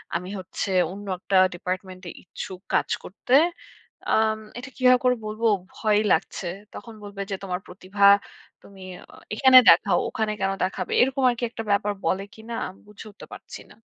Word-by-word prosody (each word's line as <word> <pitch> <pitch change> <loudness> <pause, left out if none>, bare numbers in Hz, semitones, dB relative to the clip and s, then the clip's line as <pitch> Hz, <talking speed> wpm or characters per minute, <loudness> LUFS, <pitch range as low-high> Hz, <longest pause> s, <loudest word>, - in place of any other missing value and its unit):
আমি 180 +2 -3
হচ্ছে 185 +2 -5 0.2
অন্য 200 +2 -9
একটা 195 - -3 0.2
ডিপার্টমেন্ট 185 +1 -5
এ - - -7
ইচ্ছুক 185 +1 -8
কাজ - - +1
করতে? 210 +6 -5 0.8
আম 220 0 +2 0.2
এটা 255 +3 -9
কিভাবে 255 -1 +5
করে 250 - +4
বলব, 215 +2 -6 0.3
ভয়ই 215 -1 +1
লাগছে। - - -2 0.3
তখন 230 - -10
বলবে 200 -1 -8
যে - - 0
তোমার 180 -2 -3
প্রতিভা 190 +2 -5 0.6
তুমি 195 -1 -16 0.3
অ - - -13 0.2
এখানে 260 +2 +7
দেখাও। - - +5
ওখানে 220 -2 -2
কেন 195 0 +1
দেখাবে? 185 - -3
এরকম 265 +1 +1
আরকি 240 0 -3
একটা 225 - -7
ব্যাপার 205 0 +1
বলে 195 +1 0
কিনা 225 +1 -9
আমি 185 - -13
বুঝে 210 +1 -12
উঠতে - - -13
পারছি - - -10
না। - - -16
205 Hz, 170 wpm, -24 LUFS, 190-225 Hz, 0.8 s, এখানে